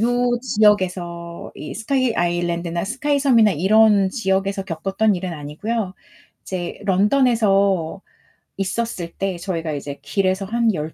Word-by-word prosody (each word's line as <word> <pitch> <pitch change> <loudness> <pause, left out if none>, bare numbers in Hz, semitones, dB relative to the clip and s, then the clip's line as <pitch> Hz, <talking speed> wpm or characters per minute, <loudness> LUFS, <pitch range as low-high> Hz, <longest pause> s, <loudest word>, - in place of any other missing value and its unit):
요 245 +1 +2
지역에서 185 -7 0
이 150 - -7
스카이 250 +3 0
아일랜드나 175 0 -1
스카이 275 +7 0
섬이나 240 -6 +4
이런 200 +3 +4
지역에서 195 -2 -1
겪었던 195 +4 0
일은 180 -1 -4
아니고요. 185 +8 -3 0.5
이제 180 -2 -5
런던에서 200 -4 +2 0.6
있었을 195 -3 -3
때 195 -2 -2
저희가 170 -3 -3
이제 145 0 -5
길에서 190 +6 0
한 230 +2 +1
열 155 -2 -4
195 Hz, 300 characters per minute, -21 LUFS, 175-220 Hz, 0.6 s, 섬이나